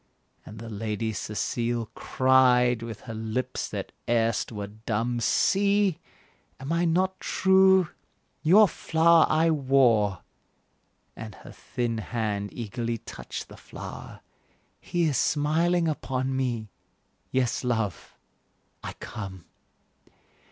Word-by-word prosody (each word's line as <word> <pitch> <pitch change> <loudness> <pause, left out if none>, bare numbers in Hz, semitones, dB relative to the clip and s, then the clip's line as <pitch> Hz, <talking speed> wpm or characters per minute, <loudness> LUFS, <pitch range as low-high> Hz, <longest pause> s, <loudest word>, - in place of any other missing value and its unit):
And 105 - -10
the 115 +1 -8
Lady 110 0 -3
Cecile 115 +4 -2
Cried 125 -2 +3
with 115 -2 -7
her 115 - -8
lips 110 +3 -3
that - - -5 0.2
erst 115 -2 +1
were 105 -2 -5
dumb 110 +3 -3
"See! 200 - +2 0.6
am 135 +5 -3
I 170 +1 +2
not 185 +3 +1
true? 190 -1 +4 0.5
your 200 +7 +6
flower 165 0 +3
I 160 +1 +3
wore," 130 -9 +2 0.9
And 110 -2 -8
her - - -13
thin 120 -2 -3
hand 105 -2 -3
eagerly 115 0 -4
touched - - -8
the - - -13
flower, - - -10 0.6
"He 175 -1 -1
is 150 -6 +1
smiling 165 +4 +2
upon 135 -3 -2
me! 120 -5 -2 0.6
yes, 130 -1 0
love, 115 -7 -2 0.7
I - - -5
come." 95 -5 -8
125 Hz, 110 wpm, -26 LUFS, 110-160 Hz, 0.9 s, your